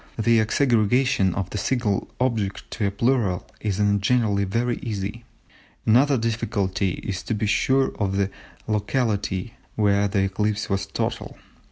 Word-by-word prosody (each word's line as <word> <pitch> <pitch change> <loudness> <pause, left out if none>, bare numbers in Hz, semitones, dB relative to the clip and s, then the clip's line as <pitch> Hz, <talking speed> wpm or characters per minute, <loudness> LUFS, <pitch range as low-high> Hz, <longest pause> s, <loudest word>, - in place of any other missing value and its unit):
The 115 +1 +3
exaggeration 115 -3 +2
of 95 -2 -2
a 105 - -3
single 115 -6 0
object 110 -6 -1
into 105 -3 -1
a - - +2
plural 105 -3 0
is 105 -2 -2
in 100 0 +3
general 110 -1 +2
very 115 +5 0
easy. 105 +1 -5 0.6
Another 130 +5 +4
difficulty 100 -5 -1
is 95 -1 -3
to 115 - -2
be 105 - -1
sure 130 +6 +2
of 100 -2 0
the 100 0 0 0.4
locality 105 -2 -1 0.2
where 100 -1 +3
the 95 -1 +1
eclipse 105 +2 -1
was 95 0 0
total. - - -3
105 Hz, 145 wpm, -24 LUFS, 100-115 Hz, 0.6 s, Another